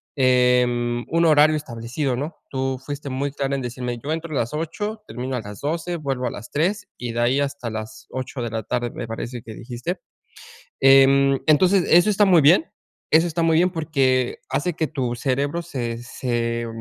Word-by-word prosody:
em, 125 -2 +2
un 165 +1 +2
horario 155 0 +5
establecido, 125 0 -3
¿no?, 145 +6 -4 0.2
tú 130 -1 -1
fuiste 145 -1 -5
muy 135 +2 -2
clara 140 -1 -2
en 135 - -3
decirme 125 0 -4
yo 150 - -3
entro 165 0 -3
a - - +1
las 120 +3 -2
8, 205 +8 -4
termino 125 +2 -4
a - - -3
las 105 -1 -10
12, 165 +4 -2
vuelvo 135 -4 -2
a - - -3
las 115 - -9
3, 180 +8 0
y 120 -2 -5
de 120 - -2
ahí 125 +4 +2
hasta 140 -4 -2
las 110 0 -7
8, 130 0 -5
de 120 - -2
la 110 0 -4
tarde, 120 +2 -2
me - - -6
parece 120 +2 -5
que 110 -1 -10
dijiste, 125 +10 -5 0.8
em, 135 0 +6
entonces, 180 +5 +4
eso 175 +5 +6
está 205 +1 +4
muy 180 -4 +6
bien 175 - +5 0.5
eso 160 +2 +6
está 170 0 -1
muy 165 -1 +3
bien 180 +1 +3
porque 135 -7 0
hace 145 +6 -1
que 160 -1 -1
tu 130 -6 -2
cerebro 140 +6 -1
se 120 -8 -4
se 120 -1 -2
135 Hz, 195 wpm, -22 LUFS, 120-155 Hz, 0.8 s, em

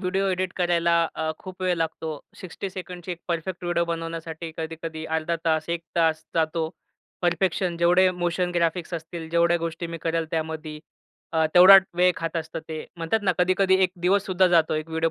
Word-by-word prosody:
Video 190 +1 0
edit 185 0 -1
करायला 170 -1 +2 0.2
अ, 160 0 -2
खूप 185 0 -10
वेळ 180 -1 +2
लागतो. 160 -1 -3 0.3
60 185 0 -7
ची 180 - -3
एक 170 - -8
परफेक्ट 175 +2 -3
व्हिडिओ 175 -1 +1
बनवण्यासाठी 165 -1 -5
कधी 160 0 -5
कधी 160 -1 -5
अर्धा 165 +1 -1
तास, 160 0 +1
1 165 -1 0
जातो. 160 0 0 0.5
परफेक्शन 175 0 +1
जेवढे 180 +2 +4
मोशन 175 0 -1
ग्राफिक्स 170 +1 0
असतील 165 0 -6
जेवढ्या 170 0 +3
गोष्टी 165 +1 -4
मी 165 0 -6
करेल 165 0 -1
त्यामध्ये, 160 -1 -4 0.5
अ, 160 -1 +2
तेवढा 185 +2 +10 0.2
वेळ 180 0 +5
खात 165 +1 -3
असतं 160 0 -4
ते. 155 -1 -5
म्हणतात 170 +6 0
ना, 190 -2 +2
कधी 180 +1 +3
कधी 190 -1 +4
एक 185 - +3 0.2
दिवससुद्धा 190 -1 +3
जातो 165 -3 +3
एक 155 +1 -3
व्हिडिओ 160 0 0
170 Hz, 175 wpm, -25 LUFS, 160-180 Hz, 0.5 s, तेवढा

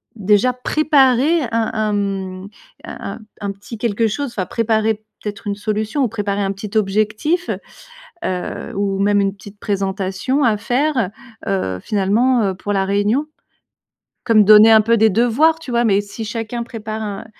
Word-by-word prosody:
déjà 210 +4 +2
préparer 280 +3 +3
un 225 -1 0
un, 215 -1 0
hem, 195 -2 -3 0.4
un - - -7
un - - -12 0.2
un 200 -1 -2
petit 200 +4 -10
quelque 225 0 0
chose, 280 +7 -2
enfin 195 -6 -3
préparer 220 +1 0 0.3
peut-être 210 0 -6
une 200 - -1
solution 215 +6 -2
ou - - +2
préparer 205 -2 -2
un 195 -1 0
petit 200 +2 -4
objectif, 215 - 0 0.8
heu, 180 -1 -4
ou 195 -1 -1
même 205 0 +3
une 195 -1 0
petite 205 +1 -14
présentation 195 +6 -1
à 225 -3 +3
faire, 245 0 0 0.4
heu, 95 - -1
finalement, 220 +5 +2
heu, 195 -2 0
pour 205 +3 -4
la 195 -1 +1
réunion? 205 +8 +1 1.0
Comme 225 -3 +5
donner 215 +2 +8
un 220 -1 +7
peu 230 +2 +2
des 220 0 +5
devoirs, 245 - +3
tu 320 -6 -8
vois, 235 0 +2
mais 200 -2 +3
si 205 +2 -8
chacun 230 +2 -4
prépare, 220 -2 -6
un 205 -1 -5
215 Hz, 165 wpm, -19 LUFS, 200-235 Hz, 1.0 s, donner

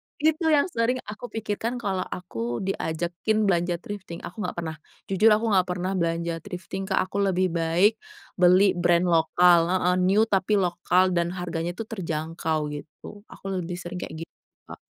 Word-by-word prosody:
Itu 315 +2 +1
yang 300 -3 +5
sering 230 +2 +1
aku 215 +3 -8
pikirkan 225 +1 -3
kalau 200 -6 -2
aku 120 -8 -4
diajakin 180 +3 -1
belanja 175 -3 +1
thrifting. 190 -5 -7
Aku 200 - -8
nggak 180 - -3
pernah 160 -2 -4 0.4
jujur 195 +3 +4
aku 220 +1 +4
nggak 185 -2 +3
pernah 185 +1 -2
belanja 170 -2 -1
thrifting, 190 +1 -6
Kak. 190 - +2
Aku 200 - -2
lebih 185 -2 +1
baik 170 +6 +2 0.4
beli 185 +2 +6
brand 175 -1 +2
lokal. 170 +1 +5
Heeh. 180 0 +2
New, 195 +4 +4
tapi 205 -1 +1
lokal. 180 0 +2
Dan 170 0 0
harganya 175 -1 -3
itu 225 - -4
terjangkau, 160 -6 -3
gitu. 155 +8 -10
Aku - - -15
lebih 175 0 -4
sering 175 0 -6
kayak - - -6
gi - - -9 0.4
Kak. - - -10
180 Hz, 165 wpm, -25 LUFS, 170-205 Hz, 0.4 s, beli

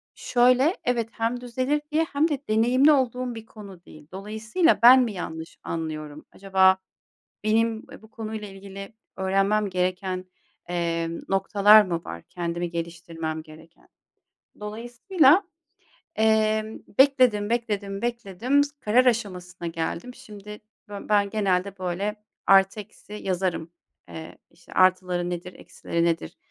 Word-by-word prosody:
Şöyle, 255 +7 +3
evet 235 -2 -1
hem 230 +3 -2
düzelir 255 +4 -1
diye 315 +2 +2
hem 290 +3 +3
de 285 -3 -1
deneyimli 245 +7 +4
olduğum 255 -3 0
bir 225 -1 -9
konu 195 -6 -13
değil. 155 -1 -15
Dolayısıyla, 215 - 0
ben 255 +2 +9
mi 225 - -3
yanlış 160 -3 -7
anlıyorum? 155 -2 -5
Acaba 190 -1 +3 0.7
benim, 225 +1 +1
eee, - - -12
bu 220 - -17
konuyla 220 -2 -6
ilgili 195 +1 -10 0.2
öğrenmem 195 +2 +1
gereken, 185 0 -2 0.4
emm, 170 -1 -2
noktalar 200 +2 +6
mı 175 -4 -3
var, 85 0 -8
kendimi 175 0 -3
geliştirmem 165 -1 -5
gereken? 160 +1 -17 0.7
Dolayısıyla, 245 - +2 0.7
eee, 220 0 +2 0.2
bekledim, 255 -7 +4
bekledim, 205 -4 -2
bekledim, 240 +3 0
s 285 - -6
karar 240 +5 +3
aşamasına 180 -7 -2
geldim. 165 +8 -4
Şimdi 210 -4 -11 0.3
bö 205 -1 -6
ben 205 -1 +3
genelde, 195 -2 -1
böyle, 190 +4 -2 0.3
artı 195 +2 +5
eksi 210 0 -12
yazarım. 185 -4 -2 0.4
Eee, 160 0 -9
işte, 175 - -17
artıları 185 -1 +2
nedir, 180 +1 -6
eksileri 170 0 -4
nedir? 165 - -2
205 Hz, 125 wpm, -25 LUFS, 180-230 Hz, 0.7 s, ben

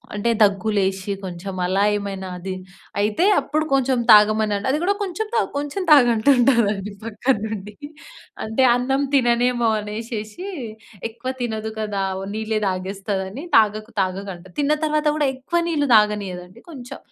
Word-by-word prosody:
అంటే 210 +3 0
దగ్గులేసి 195 -1 +1
కొంచెం 185 +1 -6
అలా 190 +2 +1
ఏమైనా, 195 -2 -5
అది 185 +1 -5 0.5
అయితే 210 - +1
అప్పుడు 310 +1 -1
కొంచెం 265 -2 +2
తాగమని 215 0 +6 0.2
అది 295 - +1
కూడా 395 +3 +2
"కొంచెం 395 +3 -3
తాగు 450 - +1
కొంచెం 290 +7 -3
తాగు" 275 -5 +7
అంటుంటారండి 225 -5 +2
పక్కన 230 +4 0
నుండి. 210 -1 -6 0.7
అంటే 220 +4 0
అన్నం 265 +3 0
తిననేమో 240 -2 +2
అనేసేసి 215 - -6 0.6
ఎక్కువ 235 +3 -5
తినదు 220 -2 -3
కదా! 205 -2 -2 0.3
నీళ్ళే 220 0 -1
తాగేస్తాదని 195 - -3
"తాగకు 215 +1 +2
తాగకు" 195 +1 -2
అంటది. 175 +1 -15
తిన్న 290 +1 +2
తర్వాత 305 0 0
గూడా 295 -3 +1
ఎక్కువ 340 +7 -1
నీళ్ళు 290 -4 0
తాగనీయదండి. 200 -4 0
కొంచెం 255 -6 -9
220 Hz, 135 wpm, -22 LUFS, 200-260 Hz, 0.7 s, తాగు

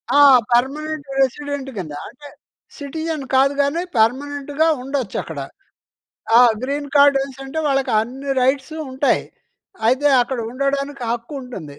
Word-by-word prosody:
ఆ! - - +6 0.3
Permanent 285 +5 0
resident 280 +1 -2
కింద. 165 -6 -5 0.2
అంటే, 290 +3 -14 0.5
సిటిజన్ 315 +1 -4
కాదు 270 +2 +4
గానీ, 280 +4 0 0.2
పర్మనెంట్‌గా 285 +6 +1
ఉండొచ్చక్కడ. 250 - -4 1.0
ఆ! - - +9 0.2
గ్రీన్ 285 +2 -3
కార్డనేసి 275 -1 +3
అంటే 270 +4 -5
వాళ్ళకి 270 -2 +1
అన్ని 265 +5 -5
రైట్సూ 270 +4 0
ఉంటాయి. 265 +2 +1 0.6
అయితే 260 +5 +2 0.2
అక్కడ 250 +1 -4
ఉండడానికి 275 +1 -2
హక్కు 235 +4 -6
ఉంటుంది. 160 - -9
275 Hz, 115 wpm, -20 LUFS, 255-285 Hz, 1.0 s, ఆ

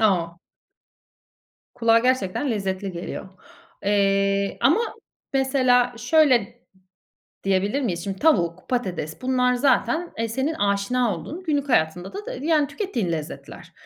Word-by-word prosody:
O! 170 -5 +1 1.4
Kulağa 230 -1 +4
gerçekten 255 +1 0
lezzetli 195 -3 -2
geliyor. 175 +2 -6 0.6
Eee, 195 -1 +1
ama 330 +11 +4 0.5
mesela, 255 -2 +3
şöyle 285 -1 +4
d - - -25 0.8
diyebilir 195 +7 +1
miyiz? 175 -8 -2
Şimdi 195 -1 -4
tavuk, 185 - +1
patates, 185 -7 -3
bunlar 250 -1 +2
zaten, 290 +6 +1
e, 230 0 -1
senin 265 +7 -1
aşina 205 +2 +1
olduğun, 345 +5 -8
günlük 290 -3 -1
hayatında 175 -4 +1
da, 395 - -6 0.2
yani, 300 0 +2
tükettiğin 250 - -3
lezzetler. 155 -2 -7
230 Hz, 115 wpm, -23 LUFS, 195-265 Hz, 1.4 s, Kulağa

